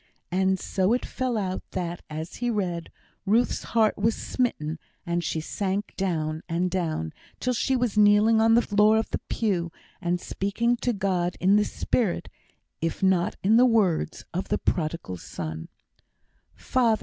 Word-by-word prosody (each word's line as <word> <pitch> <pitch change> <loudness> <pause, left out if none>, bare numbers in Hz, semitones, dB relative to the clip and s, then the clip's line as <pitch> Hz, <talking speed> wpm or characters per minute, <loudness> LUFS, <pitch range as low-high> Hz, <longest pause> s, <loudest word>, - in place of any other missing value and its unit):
And 190 +1 +2
so 190 +4 +1
it 250 - 0
fell 255 -3 -2
out 190 -3 -2
that, 175 -2 -3
as 155 +2 -6
he 245 0 -1
read, 180 -7 -2 0.3
Ruth's 225 +5 +1
heart 215 -2 +3
was 220 +2 +2
smitten, 160 -11 -2 0.3
and 170 0 -1
she 160 0 -1
sank 195 +5 -2
down, 160 -5 -1
and 175 +2 0
down, 160 - -2 0.3
till 250 - 0
she 265 +2 +1
was 240 -4 +1
kneeling 210 +2 +5
on 225 0 +5
the 235 - +5
floor 210 +1 +4
of 220 - -1
the - - -1
pew, 180 -7 0 0.3
and 175 0 0
speaking 220 +7 0
to 245 0 0
God 185 -4 -1
in 190 +2 +4
the 210 - +5
spirit, 215 -8 -1 0.5
if 165 +4 -2
not 185 -2 +2
in 215 +4 +5
the 250 - +7
words, 200 -10 +1
of 185 +3 -2
the - - +1
Prodigal 155 - -2
Son: 80 -1 -6 0.9
"Father! 235 -4 +2
190 Hz, 160 wpm, -26 LUFS, 170-220 Hz, 0.9 s, the